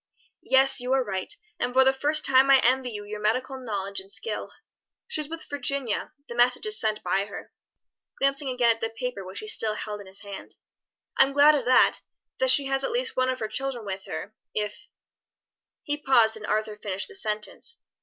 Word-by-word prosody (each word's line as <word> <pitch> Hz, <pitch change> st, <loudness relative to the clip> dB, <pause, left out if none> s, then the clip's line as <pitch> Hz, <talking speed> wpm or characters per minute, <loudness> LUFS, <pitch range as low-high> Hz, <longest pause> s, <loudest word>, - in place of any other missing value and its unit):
"Yes, 265 Hz, +1 st, +5 dB
you 250 Hz, +1 st, -1 dB
are 265 Hz, -1 st, +3 dB
right, 190 Hz, -4 st, -4 dB, 0.3 s
and 250 Hz, -, -1 dB
for 265 Hz, -, +7 dB
the 265 Hz, 0 st, +4 dB
first 300 Hz, +3 st, +2 dB
time 265 Hz, +1 st, +5 dB
I 275 Hz, -, +8 dB
envy 255 Hz, +1 st, +3 dB
you 205 Hz, -3 st, -7 dB
your 210 Hz, 0 st, -6 dB
medical 255 Hz, +5 st, -1 dB
knowledge 200 Hz, -5 st, -3 dB
and 190 Hz, +1 st, -12 dB
skill. 460 Hz, -, -5 dB, 0.6 s
She's 305 Hz, -10 st, -1 dB
with 330 Hz, 0 st, -6 dB
Virginia, 280 Hz, -5 st, -2 dB, 0.2 s
the -, -, -7 dB
message 245 Hz, -, +3 dB
is 430 Hz, -1 st, +3 dB
sent 215 Hz, -1 st, 0 dB
by 195 Hz, +1 st, 0 dB
her," 205 Hz, -, -10 dB, 0.7 s
glancing 275 Hz, 0 st, 0 dB
again 250 Hz, -2 st, +3 dB
at 225 Hz, -, -2 dB
the 225 Hz, -, -1 dB
paper 225 Hz, -2 st, -5 dB
which 190 Hz, +2 st, -7 dB
he 215 Hz, -, -8 dB
still 215 Hz, 0 st, +3 dB
held 210 Hz, -1 st, -5 dB
in 200 Hz, -, -12 dB
his 190 Hz, +1 st, -8 dB
hand. 200 Hz, -2 st, -9 dB, 0.6 s
"I'm 270 Hz, +1 st, +5 dB
glad 290 Hz, +2 st, +7 dB
of 280 Hz, -5 st, -1 dB
that 255 Hz, +1 st, +4 dB, 0.4 s
that -, -, +2 dB
she 285 Hz, -, +4 dB
has 270 Hz, 0 st, 0 dB
at -, -, 0 dB
least 480 Hz, -1 st, -1 dB
one 255 Hz, 0 st, +1 dB
of 260 Hz, -, -1 dB
her 220 Hz, -, -2 dB
children 245 Hz, 0 st, -4 dB
with 190 Hz, -1 st, -5 dB
her, 210 Hz, -, -6 dB, 0.2 s
if 210 Hz, -1 st, -4 dB, 0.5 s
" -, -, -41 dB
He 290 Hz, 0 st, -2 dB
paused 235 Hz, -6 st, +4 dB
and 210 Hz, -1 st, -8 dB
Arthur 215 Hz, 0 st, -1 dB
finished 200 Hz, -2 st, -3 dB
the -, -, -13 dB
sentence. 215 Hz, -, -4 dB
250 Hz, 205 wpm, -26 LUFS, 210-270 Hz, 0.7 s, I